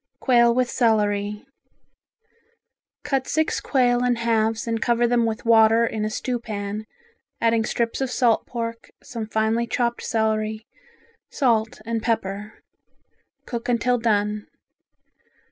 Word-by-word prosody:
Quail 235 Hz, -2 st, +4 dB
with 255 Hz, 0 st, +2 dB
Celery 210 Hz, -3 st, 0 dB, 1.6 s
Cut 270 Hz, -2 st, -1 dB
six 315 Hz, +1 st, 0 dB
quail 245 Hz, -3 st, +2 dB
in 250 Hz, -1 st, +2 dB
halves 225 Hz, -1 st, 0 dB
and 230 Hz, -1 st, -2 dB
cover 240 Hz, 0 st, +2 dB
them 235 Hz, -1 st, +2 dB
with 225 Hz, +1 st, -4 dB
water 225 Hz, 0 st, +5 dB
in 220 Hz, -2 st, -3 dB
a -, -, -1 dB
stewpan, 215 Hz, -3 st, -4 dB, 0.5 s
adding 230 Hz, -1 st, +2 dB
strips 235 Hz, +2 st, -2 dB
of 265 Hz, -, 0 dB
salt 240 Hz, -3 st, +2 dB
pork, 230 Hz, -1 st, -5 dB
some 230 Hz, -3 st, -6 dB
finely 220 Hz, +2 st, 0 dB
chopped 235 Hz, 0 st, -1 dB
celery, 220 Hz, -1 st, -1 dB, 0.6 s
salt 225 Hz, -5 st, 0 dB
and 230 Hz, 0 st, -2 dB
pepper. 215 Hz, -2 st, -3 dB, 0.8 s
Cook 235 Hz, 0 st, -5 dB
until 245 Hz, +1 st, +1 dB
done. 210 Hz, -2 st, 0 dB
230 Hz, 120 wpm, -23 LUFS, 220-240 Hz, 1.6 s, water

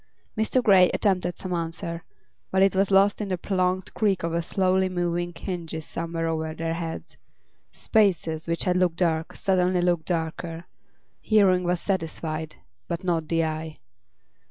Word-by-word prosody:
Mr. 220 Hz, +3 st, +1 dB
Grey 190 Hz, -5 st, +6 dB
attempted 185 Hz, -4 st, 0 dB
some 185 Hz, -1 st, -4 dB
answer, 165 Hz, 0 st, -4 dB, 0.5 s
but 190 Hz, 0 st, +3 dB
it 195 Hz, 0 st, +3 dB
was 195 Hz, 0 st, +2 dB
lost 200 Hz, +2 st, +4 dB
in 205 Hz, -, -3 dB
the 185 Hz, -, -1 dB
prolonged 185 Hz, 0 st, -1 dB
creak 200 Hz, -5 st, +1 dB
of 170 Hz, 0 st, -1 dB
slowly 185 Hz, +1 st, +1 dB
moving 175 Hz, -1 st, -1 dB
hinges 165 Hz, -2 st, -5 dB
somewhere 165 Hz, 0 st, -3 dB
over 160 Hz, -1 st, -2 dB
their 165 Hz, 0 st, -2 dB
heads. 165 Hz, -1 st, -6 dB, 0.5 s
Spaces, 170 Hz, -7 st, +1 dB
which 170 Hz, 0 st, 0 dB
had 180 Hz, -2 st, +1 dB
looked 180 Hz, -2 st, +2 dB
dark, 160 Hz, -2 st, 0 dB
suddenly 185 Hz, -1 st, +1 dB
looked 175 Hz, -2 st, +1 dB
darker; 165 Hz, 0 st, -3 dB, 0.6 s
hearing 195 Hz, -4 st, +4 dB
was 175 Hz, 0 st, 0 dB
satisfied, 160 Hz, -4 st, -3 dB, 0.3 s
but 170 Hz, +2 st, -4 dB
not 165 Hz, -3 st, 0 dB
the 165 Hz, 0 st, +1 dB
eye. 155 Hz, 0 st, -4 dB
175 Hz, 150 wpm, -25 LUFS, 165-185 Hz, 0.6 s, Grey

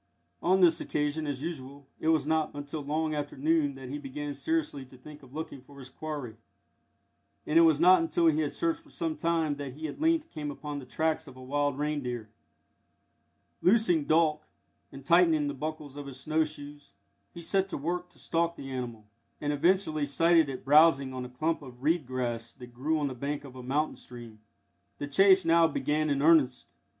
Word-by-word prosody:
On 190 Hz, +2 st, +3 dB
this 170 Hz, -2 st, +5 dB
occasion, 150 Hz, +1 st, -2 dB
as 140 Hz, -1 st, -4 dB
usual, 140 Hz, -4 st, -7 dB
it -, -, -3 dB
was 160 Hz, -3 st, +3 dB
not 160 Hz, 0 st, +1 dB
until 145 Hz, +1 st, -5 dB
long 155 Hz, +2 st, -1 dB
after 145 Hz, -2 st, -4 dB
noon 150 Hz, 0 st, +1 dB
that 135 Hz, -1 st, -9 dB
he 145 Hz, +2 st, -4 dB
began 145 Hz, +1 st, -5 dB
seriously 300 Hz, -, -2 dB
to 130 Hz, 0 st, -16 dB
think 150 Hz, +4 st, -13 dB
of 135 Hz, 0 st, -15 dB
looking 155 Hz, -4 st, -6 dB
for 140 Hz, +2 st, -17 dB
his 130 Hz, -2 st, -10 dB
quarry, 145 Hz, -8 st, -6 dB, 1.1 s
and 160 Hz, +2 st, +4 dB
it -, -, +8 dB
was 160 Hz, -3 st, +5 dB
not 180 Hz, +1 st, +6 dB
until 165 Hz, +1 st, +1 dB
he 155 Hz, -1 st, +4 dB
had 150 Hz, -2 st, 0 dB
searched 330 Hz, -1 st, -1 dB
for 315 Hz, -, -21 dB
some 165 Hz, -, -3 dB
time 160 Hz, -2 st, 0 dB
that 140 Hz, -3 st, -6 dB
he 155 Hz, +3 st, -5 dB
at 150 Hz, -, -8 dB
length 325 Hz, 0 st, +1 dB
came 150 Hz, -1 st, -5 dB
upon 145 Hz, 0 st, -6 dB
the 130 Hz, -, -11 dB
tracks 160 Hz, +2 st, -1 dB
of 130 Hz, -, -12 dB
a 130 Hz, -, -11 dB
wild 145 Hz, +1 st, -1 dB
reindeer. 130 Hz, -7 st, -3 dB, 1.3 s
Loosing 180 Hz, -7 st, +3 dB
Dolk, 155 Hz, -1 st, +3 dB, 0.5 s
and 135 Hz, -1 st, -11 dB
tightening 165 Hz, -2 st, +4 dB
the 145 Hz, -, -2 dB
buckles 150 Hz, 0 st, -6 dB
of 145 Hz, -1 st, -7 dB
his 135 Hz, -1 st, -7 dB
snow 155 Hz, +2 st, +1 dB
shoes, 145 Hz, -1 st, -9 dB, 0.4 s
he 170 Hz, -, -10 dB
set 195 Hz, +2 st, 0 dB
to -, -, -4 dB
work 175 Hz, +5 st, -3 dB
to -, -, -20 dB
stalk 170 Hz, 0 st, -1 dB
the 135 Hz, -3 st, -8 dB
animal, 120 Hz, -4 st, -5 dB, 0.3 s
and 145 Hz, 0 st, -1 dB
eventually 155 Hz, -1 st, +1 dB
sighted 165 Hz, +2 st, +3 dB
it 130 Hz, -1 st, -7 dB
browsing 140 Hz, -2 st, +5 dB
on 130 Hz, -1 st, -5 dB
a -, -, -8 dB
clump 155 Hz, +7 st, -1 dB
of 130 Hz, -2 st, -12 dB
reed 155 Hz, -2 st, +1 dB
grass 120 Hz, -2 st, -3 dB
that 125 Hz, -1 st, -13 dB
grew 150 Hz, +6 st, 0 dB
on 150 Hz, -, -1 dB
the 135 Hz, -, -4 dB
bank 140 Hz, +4 st, -4 dB
of 135 Hz, -2 st, -12 dB
a 130 Hz, -, -8 dB
mountain 140 Hz, +5 st, -1 dB
stream. 120 Hz, -3 st, -11 dB, 0.6 s
The -, -, -4 dB
chase 190 Hz, +6 st, +5 dB
now 165 Hz, 0 st, +5 dB
began 155 Hz, 0 st, -1 dB
in 140 Hz, 0 st, 0 dB
earnest. 150 Hz, -6 st, +3 dB
150 Hz, 200 wpm, -29 LUFS, 135-160 Hz, 1.3 s, it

